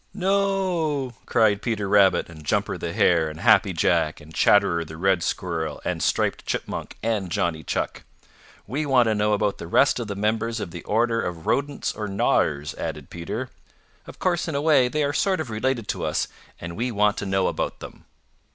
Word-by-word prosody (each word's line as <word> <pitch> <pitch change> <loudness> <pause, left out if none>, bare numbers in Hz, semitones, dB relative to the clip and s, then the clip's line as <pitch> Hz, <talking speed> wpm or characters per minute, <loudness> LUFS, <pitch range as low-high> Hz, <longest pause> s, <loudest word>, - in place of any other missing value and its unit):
"No," 185 - 0
cried 110 -3 +3
Peter 105 -4 -2
Rabbit 100 -1 +4
and 80 -2 -12
Jumper 75 - 0
the - - -4
Hare 80 -3 +3
and 80 +1 -9
Happy - - +5
Jack - - +1
and 75 +2 -14
Chatterer 100 -4 +3
the 80 0 -10
Red 95 0 +2
Squirrel 80 -3 -2
and - - -2
Striped - - 0
Chipmunk - - -4
and 110 -5 -1
Johnny 80 -1 -1
Chuck. - - -3 0.6
"We 140 +8 -2
want 130 -3 +4
to - - +2
know 105 0 +1
about 105 -1 0
the - - -7
rest 135 +9 +3
of 115 - -4
the 100 - -4
members 110 +3 -1
of 90 - -5
the 85 -1 -8
order 115 +2 +1
of 85 -2 -5
Rodents 140 0 -1
or 105 - -4
Gnawers," 95 - +1
added 75 -4 -5
Peter. 110 +9 -5 0.6
"Of - - -11
course 175 -2 0
in 160 - -3
a - - +1
way 145 -5 +4
they 150 +4 -1
are 145 0 0
sort 190 +1 +1
of 145 -7 -4
related 115 0 -1
to - - -2
us - - 0 0.3
and 85 0 -7
we 120 +5 -1
want 105 -1 +2
to 100 - -3
know 95 -1 +1
about - - -3
them." - - -11
105 Hz, 195 wpm, -24 LUFS, 85-130 Hz, 0.6 s, Happy